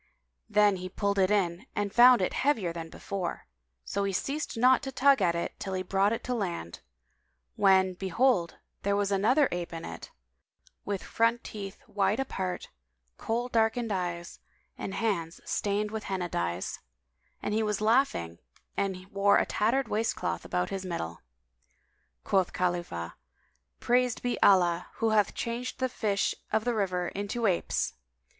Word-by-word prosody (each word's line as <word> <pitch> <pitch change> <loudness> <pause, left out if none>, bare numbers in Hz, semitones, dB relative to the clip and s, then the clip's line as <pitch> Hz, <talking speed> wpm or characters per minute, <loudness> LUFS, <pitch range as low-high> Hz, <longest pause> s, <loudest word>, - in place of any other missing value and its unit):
Then 205 -2 +4
he 185 0 -6
pulled 200 +1 -1
it 185 -1 +4
in 195 +1 0
and 205 -1 -1
found 245 -3 +7
it - - -1
heavier 225 -12 +1
than 165 -1 -6
before; 190 0 -5 0.4
so 200 - -1
he 200 - 0
ceased 280 - -3
not 255 +2 +5
to 270 - -5
tug 270 -2 +4
at 170 -2 +3
it, 170 - -2
till 190 -1 -3
he 185 - -2
brought 195 +2 +2
it 230 - -2
to 250 - -2
land, 175 - -3 0.8
when, 190 -2 +4
behold, 190 0 +1 0.2
there 200 0 +1
was 200 0 0
another 245 +9 +4
ape 175 -1 -3
in 165 -1 -6
it, 85 0 -8 0.8
with 200 -2 -3
front 230 +1 +1
teeth 200 -2 -7
wide 205 0 +1
apart, 190 -9 -3
[FN#187] 60 0 -21
Kohl 235 +2 -1
darkened 225 0 +1
eyes 175 -2 -3 0.4
and 195 - -5
hands 175 -7 -1
stained 210 +1 -1
with 220 -1 -4
Henna 185 -3 -2
dyes; 85 - -2 0.6
and 210 - -3
he 220 - +2
was 210 -2 0
laughing 215 - +1 0.4
and 190 -2 -2
wore 200 +1 +4
a - - +2
tattered 235 +5 +1
waistcloth 210 - -1
about 90 - -2
his 195 -1 -3
middle. 85 - -4 1.0
Quoth 190 -2 +1
Khalifah, 175 - -2 0.7
"Praised 250 0 +1
be 245 -1 -1
Allah 175 -3 +4
who 225 -1 +1
hath 210 -2 +2
changed 240 +1 -3
the 260 - +1
fish 205 -5 0 0.2
of 220 +1 +1
the 245 - +1
river 180 -5 0
into 205 +4 -3
apes!" 185 -5 0
200 Hz, 160 wpm, -29 LUFS, 180-225 Hz, 1.0 s, found